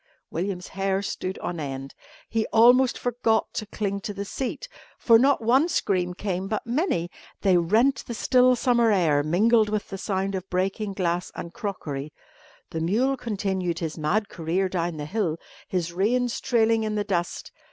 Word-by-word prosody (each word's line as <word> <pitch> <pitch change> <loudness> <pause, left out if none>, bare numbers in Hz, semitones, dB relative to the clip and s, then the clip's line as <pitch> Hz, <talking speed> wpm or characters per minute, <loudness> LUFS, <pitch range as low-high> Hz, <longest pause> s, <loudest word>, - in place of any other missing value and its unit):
William's 180 +1 -3
hair 195 0 -1
stood 190 -1 -4
on 175 -1 -3
end. 135 -2 -5 0.3
He 225 -1 -1
almost 245 +3 +5
forgot 235 -2 0
to 215 - -4
cling 200 -1 -2
to 205 +1 -5
the 200 +1 -4
seat. 265 - -4 0.3
For 230 -2 +5
not 270 -1 +3
one 265 +9 +4
scream 180 - 0
came 190 -1 -3
but 215 +1 -3
many. 235 - 0 0.3
They 190 -3 +4
rent 220 +11 +2
the 235 - -4
still 255 +1 +4
summer 235 -2 +3
air, 160 -7 +3
mingled 210 +8 +3
with 210 -1 -2
the 195 - -6
sound 195 0 -1
of 190 0 -5
breaking 195 +3 -1
glass 180 -2 -1
and 170 - -7
crockery. 155 - -5 0.6
The 160 - -3
mule 235 +11 +1
continued 195 -7 -2
his 165 -3 -3
mad 190 +7 0
career 180 +2 -1
down 175 -3 -2
the 150 - -4
hill, 170 -2 -1 0.3
his 175 -2 -2
reins 235 +6 +1
trailing 225 -3 +2
in 215 -1 -2
the 210 - 0
dust. 180 -4 -3
200 Hz, 170 wpm, -25 LUFS, 175-230 Hz, 0.6 s, almost